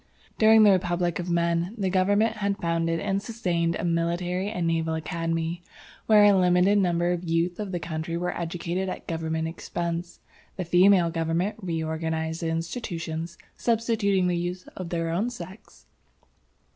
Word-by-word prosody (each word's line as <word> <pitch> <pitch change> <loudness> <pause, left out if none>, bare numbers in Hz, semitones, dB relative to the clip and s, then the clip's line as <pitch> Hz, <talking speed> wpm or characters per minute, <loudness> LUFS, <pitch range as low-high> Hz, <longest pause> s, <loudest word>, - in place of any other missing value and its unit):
"During 220 0 +7
the 205 - +7
Republic 175 -2 0
of 175 0 -4
men, 170 +3 0
the 190 -3 -1
government 205 +4 +2
had 200 -1 -1
founded 165 0 0
and 200 +1 -1
sustained 180 -7 -1
a - - -4
military 175 +3 -1
and 180 -5 -2
naval 165 -1 0
academy, 165 +1 -2 0.5
where 215 -1 +7
a 205 -1 +7
limited 185 +2 +4
number 175 -2 +1
of 175 -1 -1
the - - -2
youth 170 +3 0
of 205 -3 -4
the 175 - -2
country 160 +1 -4
were 180 +1 -2
educated 175 +2 -3
at - - -6
government 160 -1 -2
expense. 170 +1 -4 0.4
The 185 - -4
female 180 0 +5
government 165 +4 -1
re 165 -4 -2
organized 160 0 -3
the 165 - -1
institutions, 165 -1 -4 0.2
substituting 225 -5 +1
the 180 -1 +1
youth 175 +1 -4
of 185 -2 -6
their 165 -1 -1
own 200 +8 0
sex. 225 -4 -11
175 Hz, 160 wpm, -26 LUFS, 165-190 Hz, 0.5 s, During